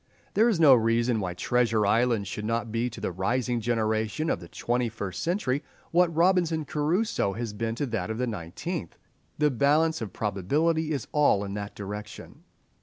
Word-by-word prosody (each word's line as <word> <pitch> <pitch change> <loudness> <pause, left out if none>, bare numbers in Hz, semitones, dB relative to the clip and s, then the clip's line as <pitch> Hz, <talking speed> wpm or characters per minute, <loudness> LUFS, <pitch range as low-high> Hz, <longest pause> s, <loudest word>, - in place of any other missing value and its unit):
There 225 +3 +4
is 205 -8 +1
no 150 -5 +8
reason 115 0 +2
why 90 -3 -3
"Treasure 115 0 +1
Island" 110 0 +2
should 105 +3 -5
not 115 +1 -2
be 115 +2 0
to 115 - -10
the - - -2
rising 120 +6 -1
generation 110 +5 0
of - - -1
the 85 - -10
twenty 120 +6 -1
first 100 -4 -5
century 155 -6 0 0.3
what 180 +1 +5
"Robinson 165 -2 +2
Crusoe" 155 - 0
has 115 -1 -4
been 115 +2 -2
to 145 - -1
that 110 -6 -3
of 110 - -3
the 125 - 0
nineteenth. 105 - -5 0.4
The 150 -1 +3
balance 150 +4 +2
of 110 - -4
probability 150 - 0
is 140 -5 -2
all 145 -9 +3
in 100 -1 -5
that 100 0 -5
direction. 105 +1 -8
120 Hz, 180 wpm, -27 LUFS, 105-150 Hz, 0.4 s, no